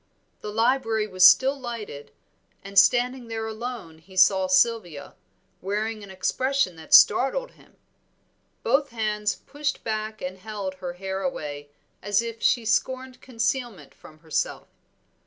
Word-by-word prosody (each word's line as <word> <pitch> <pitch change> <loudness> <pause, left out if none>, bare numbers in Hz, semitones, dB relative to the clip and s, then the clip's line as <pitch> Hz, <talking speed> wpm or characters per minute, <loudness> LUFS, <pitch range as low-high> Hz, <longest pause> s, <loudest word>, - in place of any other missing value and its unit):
The 210 - -7
library 225 -1 +1
was 185 -3 +7
still 270 +1 +2
lighted, 230 - -7 0.5
and 200 0 +3
standing 245 +2 +2
there 225 -1 -4
alone 220 -7 -7
he 185 +3 -16
saw 190 0 +5
Sylvia, 185 -6 +1 0.5
wearing 215 +3 -3
an 200 - -11
expression 225 +3 -1
that 160 - -13
startled - - +4
him. - - -23 0.9
Both 275 +4 +1
hands 210 -3 -1
pushed 290 0 -4
back 215 0 -4
and 185 +1 -6
held 205 -2 -5
her 175 -1 -4
hair 190 +1 -5
away 145 - -5 0.3
as 205 +3 +1
if 230 -1 -7
she 240 -3 +2
scorned 260 +3 -1
concealment 240 -2 -3
from 155 - -16
herself. 160 -2 -3
215 Hz, 135 wpm, -25 LUFS, 190-245 Hz, 0.9 s, was